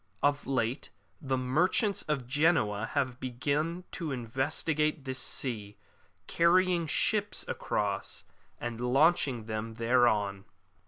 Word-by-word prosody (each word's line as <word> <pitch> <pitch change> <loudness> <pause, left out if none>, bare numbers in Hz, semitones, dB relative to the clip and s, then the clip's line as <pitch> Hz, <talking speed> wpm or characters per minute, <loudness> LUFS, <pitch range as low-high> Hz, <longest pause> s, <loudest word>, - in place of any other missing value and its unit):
Of 145 0 +1
late 130 -1 -1 0.3
the 135 -3 -1
merchants 175 - +1
of 145 -5 -1
Genoa 125 -7 +1
have 130 -4 -1
begun 145 +7 -2
to 155 -6 -3
navigate 145 +5 -1
this 130 0 -3
sea, 105 -6 -3 0.5
carrying 175 0 +3
ships 205 +6 +2
across 100 -2 -2 0.4
and 120 0 -5
launching 135 -2 +2
them 110 +1 -4
thereon. 110 -5 +2
130 Hz, 105 wpm, -30 LUFS, 115-155 Hz, 0.5 s, carrying